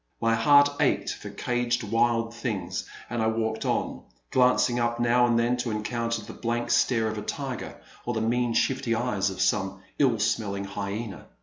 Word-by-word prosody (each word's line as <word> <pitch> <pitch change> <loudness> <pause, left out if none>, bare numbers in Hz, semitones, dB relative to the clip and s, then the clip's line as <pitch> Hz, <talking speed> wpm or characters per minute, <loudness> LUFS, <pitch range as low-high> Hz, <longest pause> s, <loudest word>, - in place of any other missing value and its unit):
My 115 0 +2
heart 145 +5 +6
ached - - +1
for - - -9
caged 120 -1 -1
wild 115 +1 +1
things, 100 -7 -4 0.2
and 120 -1 -2
I 110 - +2
walked 110 0 -1
on, - - -1 0.3
glancing 125 -1 +3
up 120 0 0
now 120 +1 +4
and 120 -1 +2
then 120 +1 +2
to 120 -1 -2
encounter 115 +1 -2
the - - -9
blank 120 0 -2
stare 120 -1 +3
of 110 -1 -3
a - - -5
tiger 130 +4 -5 0.2
or 120 - -3
the 110 - 0
mean 120 +1 +1
shifty 130 -1 +1
eyes 105 -5 0
of 95 - -7
some 95 0 0 0.2
ill 130 -5 +4
smelling 105 -2 -1
hyena. 100 -1 -5
115 Hz, 180 wpm, -26 LUFS, 110-120 Hz, 0.3 s, heart